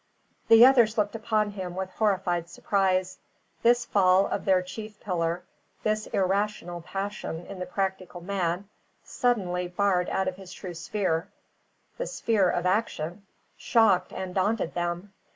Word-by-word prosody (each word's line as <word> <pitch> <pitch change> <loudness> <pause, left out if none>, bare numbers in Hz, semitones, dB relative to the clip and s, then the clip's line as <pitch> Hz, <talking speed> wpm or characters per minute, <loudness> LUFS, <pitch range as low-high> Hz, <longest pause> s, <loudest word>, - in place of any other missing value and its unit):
The 225 +1 +9
others 240 -4 +5
looked 205 -1 +1
upon 215 -2 0
him 185 -3 -6
with 190 0 -4
horrified 185 -5 0
surprise. 185 -2 0 0.4
This 240 0 +4
fall 190 -2 +4
of - - -3
their 185 -2 +3
chief 215 +3 -8
pillar 175 -2 -2 0.4
this 215 0 0
irrational 195 -2 -1
passion 195 -2 -5
in 195 -2 -9
the 180 - -4
practical 190 -2 -3
man, 180 0 -2 0.4
suddenly 185 -8 0
barred 180 0 +1
out 190 - 0
of 185 0 -3
his 190 -2 -10
true 180 0 -7
sphere, 170 -1 -1 0.7
the - - -2
sphere 215 - +1
of 175 - -1
action 185 -1 -1 0.3
shocked 210 -7 +3
and 185 -1 -5
daunted 195 -1 0
them. 175 +3 -3
190 Hz, 140 wpm, -27 LUFS, 180-210 Hz, 0.7 s, The